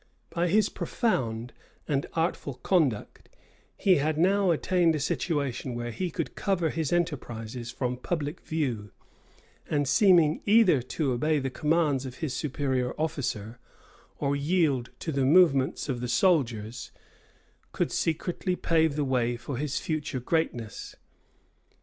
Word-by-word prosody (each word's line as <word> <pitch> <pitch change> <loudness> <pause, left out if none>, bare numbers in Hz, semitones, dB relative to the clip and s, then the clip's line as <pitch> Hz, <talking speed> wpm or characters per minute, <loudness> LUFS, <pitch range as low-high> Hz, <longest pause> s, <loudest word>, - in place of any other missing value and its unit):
By 175 0 0
his 210 +5 +3
profound 120 - -2 0.3
and 140 -2 0
artful 160 -4 -1
conduct, 135 - 0 0.5
he 185 -3 +4
had 155 +2 0
now 190 +3 +3
attained 170 0 +2
a - - -1
situation 140 -4 -2
where 120 0 -4
he 180 +9 -3
could - - -4
cover 175 -6 0
his 160 -4 -2
enterprises 125 -9 -2
from 125 0 -2
public 150 +2 -3
view; 125 -10 -2 0.8
and 145 -2 +1
seeming 165 0 +4
either 205 - +5
to 135 +3 -2
obey 150 +6 +1
the 135 -2 -2
commands 150 -2 +1
of 125 - -8
his 150 -3 -3
superior 130 -3 -1
officer, 120 -8 -3 0.6
or 140 0 0
yield 140 -4 +1
to 160 - -2
the 135 -2 0
movements 140 -3 +4
of 125 -4 -2
the 125 - -2
soldiers, 120 - +1 0.8
could - - -1
secretly 175 +3 -1
pave 160 -4 +2
the 150 -1 0
way 120 -2 0
for 120 +2 -5
his 145 0 -2
future 150 -4 -3
greatness. 120 - -2
145 Hz, 135 wpm, -28 LUFS, 125-165 Hz, 0.8 s, either